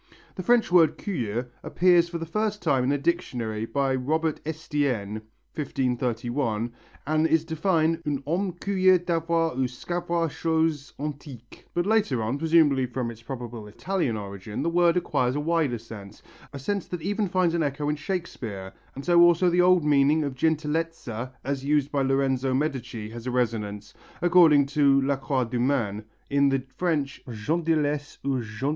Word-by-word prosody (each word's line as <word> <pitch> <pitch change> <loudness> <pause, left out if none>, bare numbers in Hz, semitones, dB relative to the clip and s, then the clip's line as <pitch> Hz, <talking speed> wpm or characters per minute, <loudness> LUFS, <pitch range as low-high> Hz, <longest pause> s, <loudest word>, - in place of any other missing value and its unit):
The - - -5
French 235 +1 +3
word 165 -4 +5
curieux 120 - -3 0.2
appears 175 -1 +3
for 170 - -4
the 165 - -5
first 210 +4 -2
time 135 -6 +2
in 130 - +1
a 145 - +2
dictionary 125 -9 -2
by 135 0 0
Robert 155 +5 -1
Estienne 140 -10 -2 0.3
(1531) 120 -4 -2 0.3
and 155 +2 +2
is 160 0 +2
defined 165 0 +1
ung 140 -2 -1
homme 180 +5 -1
curieux 185 0 +3
d'avoir 165 -1 0
ou 130 0 0
sçavoir 170 +6 -2
choses 160 -3 -1
antiques 140 -5 -8
but 175 0 +1
later 200 - +1
on, 125 +6 -2
presumably 155 -5 +3
from 125 -1 -3
its 115 0 -13
probable 120 -3 -7
Italian 135 - -2
origin, 100 +1 -6
the 170 - 0
word 175 0 +3
acquires 130 -7 0
a - - 0
wider 155 -5 +1
sense, 110 -3 -11 0.3
a - - -7
sense 195 +8 -3
that 175 -3 -6
even 205 +2 0
finds 180 -2 +1
an 170 - +1
echo 145 0 -1
in 150 - +1
Shakespeare, 130 - -5 0.2
and 135 - -7
so 175 -1 +5
also 175 +1 +5
the 180 +1 +4
old 180 -3 +4
meaning 150 +1 +4
of 140 -2 -3
gentilezza 150 -4 -2
as 135 0 -3
used 145 0 +1
by 140 - 0
Lorenzo 135 -1 +1
Medici 125 -6 -3
has 120 +1 -8
a - - -1
resonance, 110 -4 -2 0.3
according 170 -5 +6
to 140 -1 +3
Lacroix 135 -1 0
du 120 +1 -3
Maine, 115 -5 0 0.2
in 140 0 +3
the 135 -1 0
French 155 -5 -1
gentillesses 150 +4 -1
ou 135 -2 +1
gentilles 110 0 -9
curiositez. 140 - +2
145 Hz, 165 wpm, -26 LUFS, 125-165 Hz, 0.3 s, according